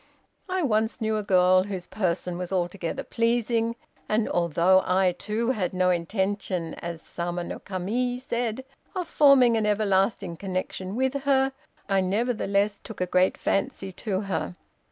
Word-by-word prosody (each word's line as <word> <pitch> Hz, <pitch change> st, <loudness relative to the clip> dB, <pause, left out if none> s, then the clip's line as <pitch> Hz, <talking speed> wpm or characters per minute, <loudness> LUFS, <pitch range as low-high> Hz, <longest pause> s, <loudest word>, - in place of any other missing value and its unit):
I 370 Hz, -1 st, 0 dB
once 220 Hz, -4 st, +1 dB
knew 220 Hz, -1 st, 0 dB
a -, -, 0 dB
girl 185 Hz, -1 st, +4 dB
whose 190 Hz, -3 st, -5 dB
person 180 Hz, -3 st, -2 dB
was 180 Hz, 0 st, -4 dB
altogether 180 Hz, +5 st, -2 dB
pleasing, 230 Hz, -1 st, 0 dB, 0.3 s
and 215 Hz, +1 st, +2 dB
although 175 Hz, +2 st, +3 dB
I, 185 Hz, 0 st, +3 dB
too, 215 Hz, +7 st, -1 dB
had 185 Hz, -7 st, -2 dB
no 185 Hz, 0 st, +3 dB
intention, 185 Hz, -1 st, -1 dB
as 170 Hz, -1 st, -6 dB
Sama 175 Hz, 0 st, -4 dB
no -, -, -6 dB
Kami 220 Hz, +7 st, -2 dB
said, 245 Hz, 0 st, -3 dB, 0.3 s
of 365 Hz, -2 st, -2 dB
forming 260 Hz, -5 st, +5 dB
an 215 Hz, -1 st, +1 dB
everlasting 195 Hz, -4 st, +1 dB
connection 185 Hz, +1 st, -4 dB
with 260 Hz, +1 st, +1 dB
her, 270 Hz, -1 st, +3 dB, 0.3 s
I 195 Hz, -1 st, +2 dB
nevertheless 205 Hz, 0 st, 0 dB
took 220 Hz, -, -9 dB
a 180 Hz, -, +1 dB
great 180 Hz, +1 st, +2 dB
fancy 195 Hz, -1 st, -1 dB
to 195 Hz, 0 st, -3 dB
her. 185 Hz, -, -3 dB
200 Hz, 150 wpm, -26 LUFS, 180-230 Hz, 0.3 s, forming